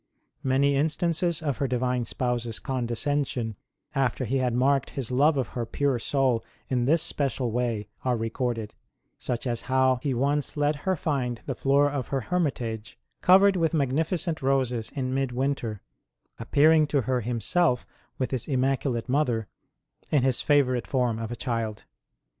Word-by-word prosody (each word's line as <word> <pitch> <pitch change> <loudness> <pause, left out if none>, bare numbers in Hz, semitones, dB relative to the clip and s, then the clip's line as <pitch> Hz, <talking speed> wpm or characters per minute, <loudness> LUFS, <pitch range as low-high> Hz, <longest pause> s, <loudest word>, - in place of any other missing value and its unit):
Many 140 +2 +2
instances 165 +3 0
of 140 -6 -1
her 140 - +1
Divine 125 -1 0
Spouse 120 0 -1
s 115 - -3
condescension 125 -1 -1 0.4
after 135 -1 0
He 130 +4 0
had 125 -2 0
marked 135 +1 +2
His 130 -4 -4
love 145 +4 +3
of 130 - -1
her 120 - -3
pure 135 +2 0
soul 130 -2 +1 0.3
in 125 -2 +1
this 160 +4 +3
special 130 -4 -1
way 115 -3 -1 0.2
are 125 -2 +1
recorded: 115 -1 -2 0.5
such 120 0 -3
as 120 -2 -1
how 130 -1 +3
He 135 -3 -1
once 140 +4 0
let 145 0 +1
her 190 - +3
find 130 -7 -2
the - - -2
floor 140 +1 +3
of 140 -3 -3
her 135 -1 -1
hermitage 120 -9 -2 0.2
covered 195 +2 +6
with 165 -2 +1
magnificent 160 +4 0
roses 130 -4 0
in 130 -2 -2
mid 135 -2 -1
winter, 125 -5 -2 0.6
appearing 155 +1 +4
to 145 -2 +1
her 125 +1 0
Himself, 125 - +1 0.3
with 130 - -2
His 130 -4 -2
immaculate 130 -3 0
Mother, 125 -6 +1 0.6
in 145 -4 +2
His 130 -2 +2
favourite 130 -5 +2
form 125 -4 0
of 115 0 -4
a - - -3
child. 115 -4 -3
130 Hz, 160 wpm, -26 LUFS, 120-145 Hz, 0.6 s, covered